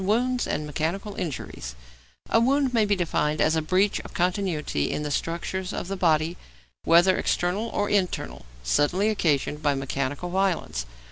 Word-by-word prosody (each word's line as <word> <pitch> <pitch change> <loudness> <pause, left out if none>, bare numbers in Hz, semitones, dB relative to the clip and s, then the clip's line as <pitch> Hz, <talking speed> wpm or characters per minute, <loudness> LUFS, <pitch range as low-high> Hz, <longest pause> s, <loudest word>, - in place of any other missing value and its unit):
X. 190 - -3
WOUNDS 245 +4 +1
AND 150 - -2
MECHANICAL 165 +8 -2
INJURIES 125 - -5 0.6
A 225 - +5
wound 265 +2 +2
may 225 -3 +4
be 205 0 +2
defined 155 -4 0
as 160 - +3
a 160 - +1
'breach 185 +6 +2
of - - -11
continuity 180 - 0
in 150 - -2
the 150 - -3
structures 170 +5 -2
of 180 - -4
the 195 - -2
body, 165 -1 +2 0.5
whether 175 +3 +6
external 185 +6 0
or 205 -2 -1
internal, 190 - -1 0.2
suddenly 160 - +2
occasioned 150 -7 0
by 145 -2 +2
mechanical 140 +5 -3
violence.' 180 - 0
175 Hz, 160 wpm, -25 LUFS, 150-200 Hz, 0.6 s, whether